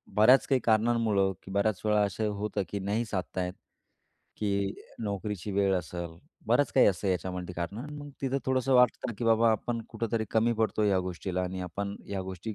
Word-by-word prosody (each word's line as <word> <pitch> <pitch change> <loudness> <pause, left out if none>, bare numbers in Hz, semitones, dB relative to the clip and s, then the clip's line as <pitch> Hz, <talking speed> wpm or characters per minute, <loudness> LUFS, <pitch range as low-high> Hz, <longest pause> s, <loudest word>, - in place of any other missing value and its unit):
बऱ्याच 115 +5 +6
काही 135 -2 +2
कारणांमुळं 110 -3 +3
की 95 - -10
बऱ्याच 100 0 +1
वेळा 105 0 +3
असं 105 +2 -1
होतं 105 0 -2
की 100 - -3
नाही 105 +4 -1
साधता 95 -3 -3
येत, 90 - -5 0.8
की 100 -1 -1 0.3
नोकरीची 100 -1 -3
वेळ 100 0 +2
असेल 85 -1 -5 0.3
बरंच 145 - +3
काही 130 - +6
असतं 100 0 +1
याच्यामध्ये 90 0 -2
कारण 100 - -5
मग 145 0 -8
तिथं 135 0 0
थोडंसं 130 0 +2
वाटतं 125 0 +4
ना - - -2
की - - -2
बाबा 115 0 +5
आपण 115 +2 -1
कुठेतरी 115 0 -2
कमी 115 +1 +3
पडतो 110 -1 0
ह्या 100 -2 +3
गोष्टीला 90 0 -3
आणि 90 +1 -3
आपण 100 +3 -4
ह्या 100 -1 -3
गोष्टी 95 +3 -6
105 Hz, 180 wpm, -29 LUFS, 95-115 Hz, 0.8 s, बऱ्याच